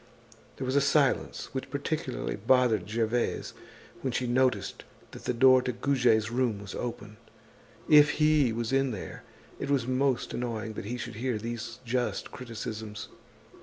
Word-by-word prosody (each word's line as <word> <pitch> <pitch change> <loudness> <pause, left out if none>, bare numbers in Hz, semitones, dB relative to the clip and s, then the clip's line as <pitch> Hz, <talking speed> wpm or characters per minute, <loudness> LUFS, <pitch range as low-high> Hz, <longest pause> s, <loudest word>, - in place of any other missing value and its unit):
There 130 - -4
was 130 +1 -1
a 140 - +5
silence 140 -1 +1
which 130 0 -4
particularly 140 -2 -3
bothered 110 -2 +2
Gervaise 115 +2 -1 0.5
when 130 - -1
she 125 +1 -1
noticed 120 -6 +1 0.3
that - - -11
the - - +1
door 130 +1 +6
to 125 - -2
Goujet's 120 -4 +2
room 120 -3 +1
was 100 -1 -8
open. 105 -3 -6 0.7
If 150 -1 +7
he 150 -5 +3
was 115 +2 -2
in 135 0 +3
there, 105 -6 -6 0.4
it 140 - -4
was 135 -4 +2
most 130 0 0
annoying 115 -2 -3
that 100 - -6
he 120 +4 -3
should 110 - -6
hear 125 -1 -1
these 115 +1 -6
just 125 +1 -2
criticisms. 110 -3 -6
125 Hz, 155 wpm, -29 LUFS, 110-130 Hz, 0.7 s, If